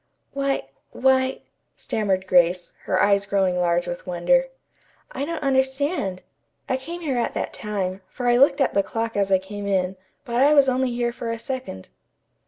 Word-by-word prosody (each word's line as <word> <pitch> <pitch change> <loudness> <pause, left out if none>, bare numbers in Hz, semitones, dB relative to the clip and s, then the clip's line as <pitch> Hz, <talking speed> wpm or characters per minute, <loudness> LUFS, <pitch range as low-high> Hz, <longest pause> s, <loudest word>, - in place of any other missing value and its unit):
"Why 275 - -1 0.2
why 260 0 +1
" - - -50
stammered 195 -3 -1
Grace, 175 -1 +2
her 185 - +1
eyes 200 -1 +3
growing 195 -2 +1
large 175 0 +1
with 175 +1 -6
wonder. 180 +10 +2 0.7
"I 280 - -3
don't 330 0 -4
understand. 265 - 0 0.4
I 260 - +1
came 335 +7 -7
here 280 -6 -1
at 235 - -2
that - - -3
time, 195 -3 -3
for 250 - -6
I 240 0 +4
looked 275 +2 +4
at 270 - +2
the 200 - +3
clock 225 +2 -3
as 200 -1 0
I 190 - +6
came 200 +2 -7
in, 190 -1 0 0.3
but 240 -1 0
I 290 +2 +5
was 280 -2 +6
only 260 0 +1
here 240 0 -1
for 235 -1 -5
a 230 - -2
second." 250 - -6
230 Hz, 185 wpm, -23 LUFS, 190-265 Hz, 0.7 s, I